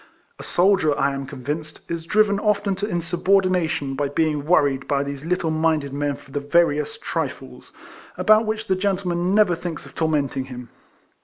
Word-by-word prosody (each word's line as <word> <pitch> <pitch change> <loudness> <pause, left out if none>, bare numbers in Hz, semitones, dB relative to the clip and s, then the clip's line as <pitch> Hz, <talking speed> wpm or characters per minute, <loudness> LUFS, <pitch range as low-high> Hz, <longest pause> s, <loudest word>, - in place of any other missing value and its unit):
A - - -7
soldier, 175 -5 +2
I 140 0 +1
am 135 -1 -5
convinced, 150 +5 -5
is 170 -1 -4
driven 205 +2 +2
often 210 -1 +1
to 205 +1 -2
insubordination 175 -4 +1
by 140 +1 -1
being 150 -1 0
worried 140 -6 +2
by 140 -1 +1
these 140 0 -6
little 170 -1 0
minded 155 -3 0
men 145 0 -1
for 135 - -16
the 145 - -2
veriest 150 0 +1
trifles, 65 -1 -5 0.5
about 215 +1 +4
which 215 0 -2
the 190 - +1
gentleman 185 -1 0
never 210 -4 +4
thinks 165 -3 -5
of 135 - -14
tor 160 +1 0
menting 140 -3 -1
him. 125 -2 -9
160 Hz, 170 wpm, -22 LUFS, 140-185 Hz, 0.5 s, about